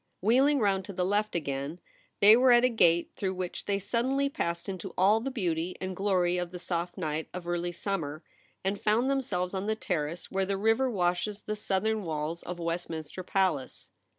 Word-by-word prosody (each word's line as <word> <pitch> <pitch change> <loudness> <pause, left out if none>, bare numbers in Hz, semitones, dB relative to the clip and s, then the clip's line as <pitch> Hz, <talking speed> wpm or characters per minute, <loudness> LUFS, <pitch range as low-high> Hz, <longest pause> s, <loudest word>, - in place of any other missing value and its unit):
Wheeling 265 +8 +4
round 200 -5 +2
to 200 - -7
the 180 0 0
left 205 +2 0
again, 140 +1 -3 0.4
they 210 +2 +9
were 250 +1 +5
at 240 +1 +6
a - - +4
gate 170 -7 +3
through 190 -1 -2
which 180 -1 -4
they 200 -1 +1
suddenly 260 +7 0
passed 170 -10 -3
into 190 -3 -6
all 200 +4 +5
the 255 +4 -3
beauty 180 -8 -2
and 185 0 -4
glory 180 -2 +1
of 175 -1 -3
the 180 - -6
soft 175 0 -3
night 155 -3 -3
of 180 -1 -6
early 175 0 -1
summer, 170 -5 -3 0.4
and 195 +1 -1
found 230 +5 +2
themselves 185 -10 -1
on 195 +1 -2
the 220 - +1
Terrace 170 -5 -3
where 195 0 0
the 195 0 0
river 225 +6 +2
washes 195 0 0
the 215 - -3
southern 210 +1 0
walls 160 -1 -3
of 180 0 -6
Westmin 170 -1 -3
ster 170 +5 -7
Palace. 185 -7 -1
190 Hz, 195 wpm, -29 LUFS, 175-215 Hz, 0.4 s, they